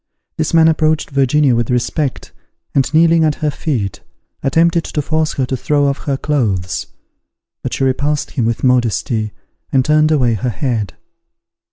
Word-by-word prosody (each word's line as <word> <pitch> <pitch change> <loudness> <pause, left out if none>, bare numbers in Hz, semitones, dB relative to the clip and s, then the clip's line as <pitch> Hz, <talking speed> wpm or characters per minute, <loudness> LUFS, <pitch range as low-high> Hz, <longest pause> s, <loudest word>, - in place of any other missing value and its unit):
This 155 -1 -1
man 165 -1 +5
approached 155 -1 +1
Virginia 140 -1 +3
with 115 -1 -1
respect, 130 +3 -2 0.4
and, 135 -2 +1
kneeling 165 +1 +4
at 155 -2 +2
her 150 -1 -1
feet, 115 - -3 0.4
attempted 165 +4 +2
to - - -4
force 155 +1 0
her 130 - -1
to 130 - -2
throw 145 +2 +1
off 140 0 -2
her 140 -2 0
clothes; 100 - -1 0.7
but - - -3
she - - -2
repulsed 140 +3 0
him 120 -6 -1
with 115 - -2
modesty, 120 -3 +1 0.4
and 130 -2 +2
turned 155 0 +3
away 125 -6 +2
her 110 +4 -2
head. 115 -4 -2
140 Hz, 160 wpm, -16 LUFS, 120-155 Hz, 0.7 s, man